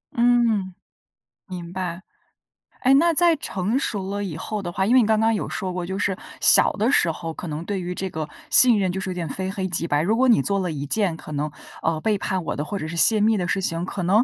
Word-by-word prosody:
嗯， 235 -6 +2 0.7
明 175 -2 -7
白。 185 -1 -4 0.8
哎， 265 +1 +4
那 335 +4 +4
在 340 +1 +4
成 205 - -3
熟 195 -7 -3
了 205 0 -3
以 180 -6 -5
后 210 -2 -5
的 175 - -4
话， 190 +2 -1
因 240 - +3
为 255 - +7
你 220 - +2
刚 220 -1 +2
刚 225 0 +2
有 205 - -3
说 185 -1 -4
过， 180 -1 -4
就 190 +2 -4
是 195 -2 -1 0.2
小 - - +6
的 225 +6 0
时 170 - +3
候， 165 0 -5
可 175 - -7
能 155 +2 -5
对 195 0 -3
于 180 0 -4
这 190 - -3
个 155 -2 -5 0.2
信 240 -4 +7
任， 185 -2 0
就 190 - -4
是 190 - -4
有 - - -4
点 170 -3 -4
非 190 +5 -4
黑 190 -1 -3
即 170 -2 -2
白。 145 +1 +1
如 215 +6 +1
果 260 +1 +3
你 230 - +5
做 200 -1 -1
了 180 -2 -2
一 145 -2 -5
件 185 -1 0
可 155 - -10
能， 150 +1 -2 0.3
呃， 160 -1 0
背 215 +2 +1
叛 190 -3 -3
我 - - -3
的， 150 - -3
或 200 +6 -4
者 155 - -5
是 170 +2 -6
泄 210 +7 +5
密 220 +1 +3
的 180 -2 -2
事 195 - 0
情， 165 -1 -2
可 185 -1 -4
能 205 +6 +4
190 Hz, 280 characters per minute, -23 LUFS, 170-215 Hz, 0.8 s, 为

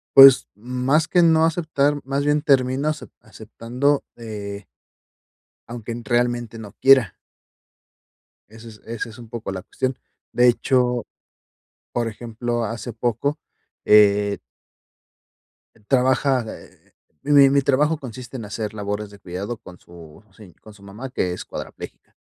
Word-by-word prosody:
Pues, 135 -1 +9
más 125 +7 0
que 175 - +3
no 160 -1 +5
aceptar, 150 -3 0
más 140 +2 -2
bien 145 0 +2
termino 135 0 +2
acep 155 -1 -5
aceptando, 125 +6 -2
eh 105 -4 -7 1.0
aunque 120 -1 -7
en 115 0 -6
realmente 120 0 -1
no 105 -2 -10
quiera. 130 -6 +5 1.4
Eso 110 +1 -13
es 105 -1 -15
esa 115 0 -5
es 110 - -13
un 120 -2 -12
poco 115 -3 -5
la 95 -1 -5
cuestión. 130 +5 -3 0.3
De 125 0 +4
hecho, 125 -1 +1 0.9
por 120 -1 -1
ejemplo, 120 +1 -4
hace 115 +2 -5
poco, 120 +6 -1 0.5
eh 105 -1 +5 1.5
trabaja 130 0 +2
eh, - - -13 0.3
eh, 145 - -2
mi 140 -1 +7
mi 140 0 +3
trabajo 145 +4 +2
consiste 130 -1 -9
en 115 - -7
hacer 105 +1 -5
labores 105 0 -4
de 100 - -15
cuidado 100 +5 -6
con 90 -3 -14
su 85 0 -15
se 100 -6 -15
con 110 - -16
su 100 -1 -19
mamá, 110 +7 -8
que 90 -8 -2
es - - -7
cuadraplégica. - - -9
120 Hz, 140 wpm, -22 LUFS, 105-135 Hz, 1.5 s, Pues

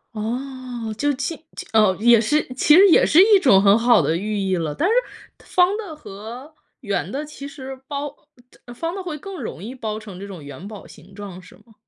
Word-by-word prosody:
哦， 245 0 -5
就 290 +6 0
其 280 +5 -3 0.2
其 - - -6
哦， 210 -4 +4
也 235 0 +5
是 295 +7 +1
其 295 +4 +4
实 395 +2 +8
也 - - +6
是 330 - +4
一 415 -2 +6
种 230 - +5
很 200 +1 +5
好 240 +1 +5
的 160 - +1
寓 210 +3 -3
意 190 -1 0
了， 160 -4 -3
但 355 - +1
是 445 - +2 0.5
方 365 +2 +2
的 410 -7 -6
和 245 +2 -10 0.3
圆 205 -6 -3
的， 285 +3 -4
其 280 -2 -9
实 270 -2 -9
包 290 0 -5 0.6
方 330 +7 -4
的 390 - -5
会 330 -4 -5
更 385 +3 -8
容 170 - -7
易 235 +5 -6
包 220 -4 -4
成 200 -4 -11
这 200 - -8
种 185 -6 -10
元 145 +6 -9
宝 210 -2 -10
形 180 +5 -16
状， 195 -3 -9
是 180 - -16
吗？ 230 - -23
240 Hz, 225 characters per minute, -21 LUFS, 200-295 Hz, 0.6 s, 实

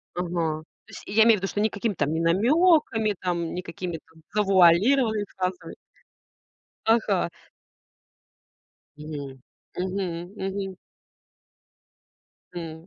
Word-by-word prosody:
Ага. 170 -3 -2 0.2
То - - -17
есть, - - -10
и - - -7
я 220 +1 +6
имею 225 -2 +6
в - - -9
виду, 195 - -1
что 205 - -3
никакими 215 0 0
там 145 -3 -1
не 160 - -1
намёками, 225 - +3
там, 170 -2 -2
никакими 175 -1 -5
там 160 0 -20
завуалированными 210 +4 +4
фразами. 185 -1 -3 1.1
Ага. 220 -6 +2 1.7
Мгм, 145 -3 -8 0.4
мгм. 180 -1 -3
Мгм. 195 -1 -4 1.8
М. 165 -1 -7
185 Hz, 105 wpm, -25 LUFS, 165-210 Hz, 1.8 s, я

